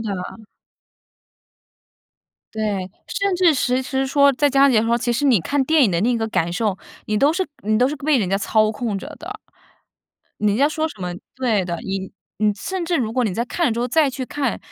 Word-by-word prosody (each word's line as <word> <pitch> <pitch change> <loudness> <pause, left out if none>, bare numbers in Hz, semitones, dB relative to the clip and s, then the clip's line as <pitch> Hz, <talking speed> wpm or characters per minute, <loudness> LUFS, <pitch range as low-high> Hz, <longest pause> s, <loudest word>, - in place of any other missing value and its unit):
的。 200 -1 -5 2.1
对， 205 -4 -2 0.2
甚 400 0 -1
至 350 -3 +4
其实 260 +1 0
说， 280 +1 +4
在 285 +2 +2
家 275 +1 +5
里 270 - +3
的 215 - +5
时 225 - -1
候， 235 0 +2
其 240 0 -1
实 255 +5 -1
你 250 -9 +4
看 280 - 0
电 315 -1 +4
影 215 - +2
的 170 -1 0
那 240 +4 +2
个 225 - -1
感 170 -5 0
受， 200 +1 -1 0.3
你 215 - 0
都 280 +7 +4
是 370 +2 -1 0.2
你 215 +1 +1
都 250 - +3
是 295 - -3
被 290 0 +1
人 195 -6 -1
家 195 - +1
操 215 +1 +2
控 215 -2 -3
着 270 - -8
的。 400 +6 -7 1.0
人 210 -1 +2
家 275 +4 +4
说 315 +1 -1
什 255 -11 -13
么 180 0 -3 0.2
对 235 -7 0
的， 170 -1 -3
你 190 -1 -4 0.3
你 210 0 +2
甚 375 - -4
至 345 0 +1
如 225 -6 -1
果 250 +1 +1
你 210 - -1
在 235 - -1
看 340 +7 -1
了 245 - +1
之 230 - -4
后， 240 - 0
再 295 +4 +3
去 260 0 -4
看， 270 -1 -2
245 Hz, 240 characters per minute, -21 LUFS, 210-280 Hz, 2.1 s, 家